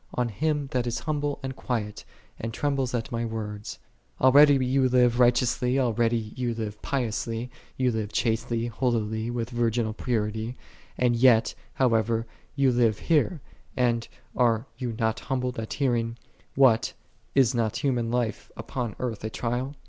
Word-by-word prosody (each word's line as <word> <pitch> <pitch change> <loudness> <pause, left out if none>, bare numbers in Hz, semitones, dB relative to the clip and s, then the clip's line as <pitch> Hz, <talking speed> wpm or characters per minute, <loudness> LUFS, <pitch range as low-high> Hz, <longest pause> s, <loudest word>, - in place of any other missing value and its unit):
On 125 -1 0
him 150 +5 -1
that 125 -1 0
is 120 - -2
humble 145 -2 -1
and 130 -1 -4
quiet, 110 -6 -4 0.3
and 115 - -4
trembles 135 -1 -1
at 115 -2 -3
My 115 0 -1
words."6 105 -2 -5 0.5
Already 145 +2 +7
thou 130 +1 +1
livest 125 -1 +3
righteously, 125 +1 +3
already 115 -3 +1
thou 130 - -7
livest 110 -3 -4
piously, 120 -2 -2 0.3
thou 130 - 0
livest 110 -4 0
chastely, 115 0 0
holily, 115 -2 -1
with 120 0 -3
vir 120 -1 +1
ginal 110 -1 -1
purity; 110 0 -2 0.4
as 120 -2 +2
yet, 120 -4 +5 0.2
however, 115 -2 +2 0.3
thou 140 - +1
livest 120 -5 +3
here, 160 -1 +1 0.4
and 120 -2 +1 0.3
art 115 -1 +2
thou 125 - -2
not 110 -1 0
humbled 125 -2 -2
at 110 - -4
hearing, 120 -4 0 0.2
" - - -34
What, 115 -3 +3 0.4
is 135 -2 +4
not 115 -1 0
human 125 -5 +1
life 120 -2 -2
upon 120 -5 -4
earth 115 -5 -4
a 110 - -2
trial 125 +5 -3
120 Hz, 155 wpm, -26 LUFS, 115-130 Hz, 0.5 s, Already